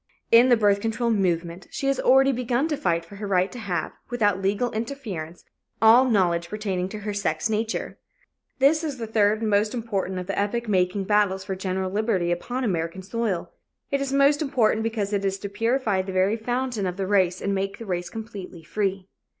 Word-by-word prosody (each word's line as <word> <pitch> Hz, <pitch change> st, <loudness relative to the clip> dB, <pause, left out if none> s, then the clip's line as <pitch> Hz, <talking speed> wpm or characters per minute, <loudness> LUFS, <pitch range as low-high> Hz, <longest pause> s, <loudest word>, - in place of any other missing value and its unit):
In 235 Hz, +2 st, +7 dB
the 240 Hz, -, +6 dB
birth 205 Hz, -2 st, +3 dB
control 230 Hz, +2 st, 0 dB
movement, 175 Hz, -3 st, -1 dB
she -, -, -5 dB
has 275 Hz, -1 st, +1 dB
already 270 Hz, +1 st, +5 dB
begun 250 Hz, +3 st, 0 dB
to 300 Hz, -, 0 dB
fight 170 Hz, -8 st, 0 dB
for 200 Hz, +4 st, -12 dB
her 205 Hz, 0 st, -5 dB
right 185 Hz, -1 st, +2 dB
to 250 Hz, -, -8 dB
have, 180 Hz, -7 st, -2 dB, 0.2 s
without 205 Hz, -5 st, +1 dB
legal 205 Hz, +5 st, 0 dB
interference, 215 Hz, -, -5 dB, 0.3 s
all 235 Hz, +4 st, +6 dB
knowledge 170 Hz, -5 st, +2 dB
pertaining 195 Hz, -3 st, -2 dB
to 215 Hz, -, -6 dB
her 210 Hz, 0 st, -3 dB
sex 200 Hz, 0 st, -1 dB
nature. 220 Hz, +1 st, -2 dB, 0.6 s
This 295 Hz, +4 st, +4 dB
is 295 Hz, -4 st, -3 dB
the 230 Hz, -, -4 dB
third 215 Hz, -1 st, +2 dB
and 220 Hz, -, 0 dB
most 210 Hz, +3 st, +2 dB
important 200 Hz, -5 st, -2 dB
of 180 Hz, -, -4 dB
the 195 Hz, +2 st, -2 dB
epoch 235 Hz, +4 st, -1 dB
making 185 Hz, 0 st, +1 dB
battles 200 Hz, -2 st, +2 dB
for 190 Hz, -, -4 dB
general 185 Hz, 0 st, -2 dB
liberty 200 Hz, -4 st, 0 dB
upon 245 Hz, +9 st, -2 dB
American 175 Hz, -3 st, -2 dB
soil. 210 Hz, -3 st, -2 dB, 0.4 s
It 280 Hz, 0 st, +1 dB
is 275 Hz, -1 st, -2 dB
most 280 Hz, +2 st, +4 dB
important 245 Hz, -7 st, +2 dB
because 220 Hz, -2 st, -2 dB
it 200 Hz, -1 st, 0 dB
is 195 Hz, 0 st, 0 dB
to 200 Hz, +1 st, -6 dB
purify 225 Hz, -1 st, 0 dB
the 190 Hz, 0 st, -6 dB
very 190 Hz, +3 st, +2 dB
fountain 240 Hz, -2 st, -2 dB
of 180 Hz, 0 st, -4 dB
the 195 Hz, -, -1 dB
race 185 Hz, -2 st, +2 dB
and 200 Hz, -, -1 dB
make 195 Hz, 0 st, -2 dB
the 230 Hz, -, -8 dB
race 180 Hz, -3 st, -3 dB
completely 200 Hz, -6 st, -8 dB
free. 195 Hz, +2 st, -2 dB
205 Hz, 200 wpm, -25 LUFS, 190-235 Hz, 0.6 s, In